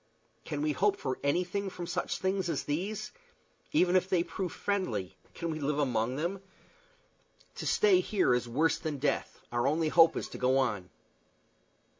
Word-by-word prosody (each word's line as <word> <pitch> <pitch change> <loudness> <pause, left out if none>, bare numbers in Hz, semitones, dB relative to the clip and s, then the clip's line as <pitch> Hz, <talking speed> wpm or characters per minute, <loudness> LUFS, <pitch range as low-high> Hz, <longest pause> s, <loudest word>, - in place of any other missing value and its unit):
Can 145 0 -3
we 155 - +2
hope 200 +6 +2
for 130 -2 -3
anything 180 +7 0
from 180 -2 -6
such - - -2
things 190 -1 -1
as - - -1
these? 195 +8 -3 0.6
Even 180 - +3
if 185 0 +3
they 180 -3 +3
prove 180 -1 -4
friendly, 125 - -2 0.2
can 170 -1 -3
we 155 - -4
live 145 0 -1
among 125 -4 0
them? 175 +6 -2 1.2
To - - -4
stay 405 -4 +5
here 205 - +2
is 125 -1 0
worse 160 +6 +2
than 155 -2 -3
death; 140 +2 -1
our 120 +2 +1
only 155 +2 +1
hope 165 +1 +6
is - - -3
to - - -8
go 130 +1 +3
on." 105 -9 0
160 Hz, 170 wpm, -30 LUFS, 135-190 Hz, 1.2 s, hope